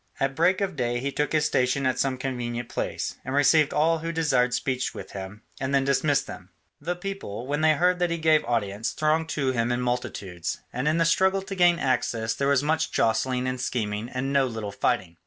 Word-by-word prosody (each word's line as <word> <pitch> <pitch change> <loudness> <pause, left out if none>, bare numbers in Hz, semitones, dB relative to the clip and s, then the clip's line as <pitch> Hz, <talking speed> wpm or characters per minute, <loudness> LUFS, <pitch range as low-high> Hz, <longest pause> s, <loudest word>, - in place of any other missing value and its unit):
At 135 0 0
break 180 +5 +3
of 195 -4 -1
day 120 -2 -1
he 140 +3 -2
took 150 +1 -1
his 155 -1 +2
station 135 -1 +1
at 130 -1 +1
some 135 -2 0
convenient 120 -2 -4
place, - - -3
and 130 +1 -3
received 145 +1 +4
all 165 +2 +2
who 165 +1 -3
desired 135 -7 +2
speech 130 0 -1
with - - -8
him, 100 +3 -8 0.2
and 135 0 -1
then 135 - +3
dismissed 140 +1 +2
them. 90 - -10 0.3
The 175 +4 -3
people, 175 - -6
when 145 +3 -1
they 155 0 +5
heard 180 +4 +2
that 175 -1 +1
he 170 - -1
gave 155 -1 +3
audience, 110 -3 -1
thronged 155 +1 +1
to 135 -4 0
him 120 -1 0
in 120 - 0
multitudes, 105 -8 -3 0.2
and 125 +4 -2
in 155 +2 +2
the 165 - +3
struggle 190 +3 +2
to 195 0 -6
gain 175 -2 +4
access 120 -5 0
there 140 +4 -1
was 140 -1 +3
much 160 +2 0
jostling 125 +3 +1
and 130 -1 -2
scheming 110 -2 -2
and 135 +2 -3
no 135 -1 +3
little 110 -4 -5
fighting. 85 -3 -1
135 Hz, 215 wpm, -26 LUFS, 120-155 Hz, 0.3 s, they